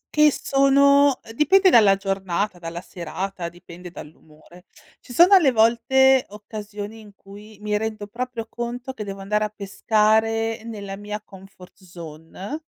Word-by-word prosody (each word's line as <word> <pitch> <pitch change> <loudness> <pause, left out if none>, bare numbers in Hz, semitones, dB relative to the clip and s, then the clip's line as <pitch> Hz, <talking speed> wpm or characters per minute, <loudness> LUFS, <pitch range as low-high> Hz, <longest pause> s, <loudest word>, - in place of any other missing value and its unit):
che 300 0 +4
sono 280 0 +3
ehm, 225 - -11
dipende 380 +8 +4
dalla 210 - +5
giornata, 195 -1 -3
dalla 170 0 -7
serata, 180 0 -6
dipende 175 +1 -12
dall'umore. 160 +2 -15 0.4
Ci - - -13
sono 350 +10 +6
alle 320 -9 +5
volte 250 +3 +3
occasioni 210 +1 -9
in 210 -2 -16
cui 205 +2 -15
mi 210 0 -1
rendo 215 -1 -4
proprio 235 +1 -6
conto 240 +3 -6
che 220 -5 -7
devo 195 -1 -8
andare 210 +2 -1
a - - -2
pescare 220 +2 0
nella 200 -4 -7
mia 210 +1 -6
comfort 195 -1 -16
zone 175 - -9
210 Hz, 140 wpm, -22 LUFS, 195-240 Hz, 0.4 s, sono